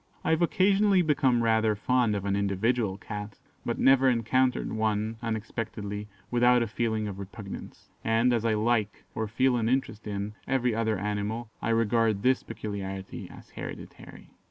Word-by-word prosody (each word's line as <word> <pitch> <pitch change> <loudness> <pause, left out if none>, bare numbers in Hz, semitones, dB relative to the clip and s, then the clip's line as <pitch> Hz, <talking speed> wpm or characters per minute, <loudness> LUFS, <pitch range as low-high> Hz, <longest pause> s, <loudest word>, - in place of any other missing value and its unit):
I - - +1
have 160 +1 +2
occasionally 195 +2 +4
become 135 -6 +2
rather 110 -1 +3
fond 120 0 +1
of 100 -1 -3
an 100 0 +1
individual 100 +1 0
Cat, 105 0 -7 0.3
but - - -2
never 135 0 +5
encounter 125 +2 +2
one, 110 0 -1
unexpectedly, 110 -2 -4 0.2
without 120 0 +4
a - - -2
feeling 110 -1 -1
of 100 -1 -6
repugnance; 100 0 -9
and, 115 +2 +3
as 115 -2 +1
I 115 -2 +2
like, 110 -1 0
or 110 0 -2
feel 125 +3 +2
an 115 -1 0
interest 125 -4 -1
in, 100 0 -3
every 125 -3 +1
other 110 -1 0
animal, 105 +3 -3
I - - -1
regard 115 -2 +2
this 130 +1 +3
peculiarity 95 -2 -6
as - - -14
hereditary." - - -9
110 Hz, 155 wpm, -28 LUFS, 105-125 Hz, 0.3 s, never